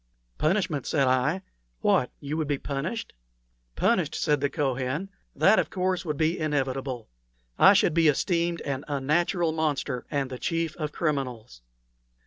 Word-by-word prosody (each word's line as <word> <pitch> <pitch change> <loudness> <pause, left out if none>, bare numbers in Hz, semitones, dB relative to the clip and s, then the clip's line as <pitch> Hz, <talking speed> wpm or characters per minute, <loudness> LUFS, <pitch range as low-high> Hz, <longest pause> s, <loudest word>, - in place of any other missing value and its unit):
"Punishment!" 160 -4 0
said 140 -4 +2
I. 135 +9 +1 0.4
"What! 125 - +3
would 140 - -10
you 155 +2 -1
be 145 -1 -1
punished?" 145 +12 -4 0.6
"Punished!" - - +1
said 150 -2 +1
the 140 - +1
Kohen. 135 +5 -2 0.3
"That, 215 +3 +5
of - - 0
course, 185 -1 -1
would 150 -3 -2
be 160 +3 +1
inevitable. 135 -5 -2 0.5
I - - +8
should - - +3
be 165 0 +4
esteemed 170 +3 +1
an 135 0 -3
unnatural 160 +5 +1
monster 150 -5 -2
and 140 -2 -2
the 130 - -6
chief 165 -1 -1
of 155 -3 -3
criminals. 130 - -3
150 Hz, 145 wpm, -27 LUFS, 135-165 Hz, 0.6 s, I